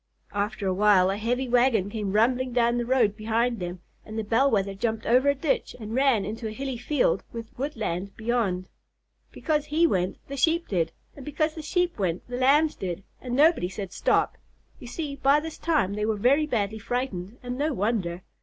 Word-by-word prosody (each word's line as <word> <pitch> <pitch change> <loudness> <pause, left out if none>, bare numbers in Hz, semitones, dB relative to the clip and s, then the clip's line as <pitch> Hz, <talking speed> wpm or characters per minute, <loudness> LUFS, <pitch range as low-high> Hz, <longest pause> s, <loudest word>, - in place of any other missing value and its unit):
After 205 0 -2
a 190 - +1
while 190 -1 +4
a 195 - -2
heavy 245 +4 -1
wagon 240 -5 +3
came 205 -3 -3
rumbling 250 +3 +2
down 240 0 +2
the 240 - -2
road 240 -5 +3
behind 225 +2 0
them, 175 0 -5 0.2
and 220 +1 -8
the 220 - -1
Bell 230 +6 +3
Wether 195 -4 0
jumped 220 +2 -2
over 255 +4 +4
a 280 - +3
ditch 280 +2 -1
and 215 -1 -6
ran 255 -6 +3
into 220 +3 -4
a - - -4
hilly 265 +2 -4
field 300 - +1
with 230 -1 -8
woodland 215 - -3
beyond. 220 -6 -1 0.6
Because 300 -2 -1
he 310 +3 +2
went 185 - 0
the 275 - -6
Sheep 330 +5 +2
did, 165 -4 0 0.2
and 280 - -10
because 305 +3 -1
the 315 - -7
Sheep 350 - -1
went 180 -3 -1
the 245 0 -4
Lambs 290 +5 +4
did, 180 0 -5 0.2
and 245 -1 -3
nobody 295 - +4
said 195 -1 -6
"Stop!" - - +1 0.4
You 245 - -10
see, 280 +2 -5
by 280 +2 +4
this 320 +1 -7
time 300 - +1
they 210 +1 -1
were 220 - +1
very 275 +8 +3
badly 220 -5 -1
frightened, 220 -3 -3
and 245 0 -4
no 295 +4 0
wonder. 195 -7 -1
235 Hz, 200 wpm, -26 LUFS, 205-275 Hz, 0.6 s, while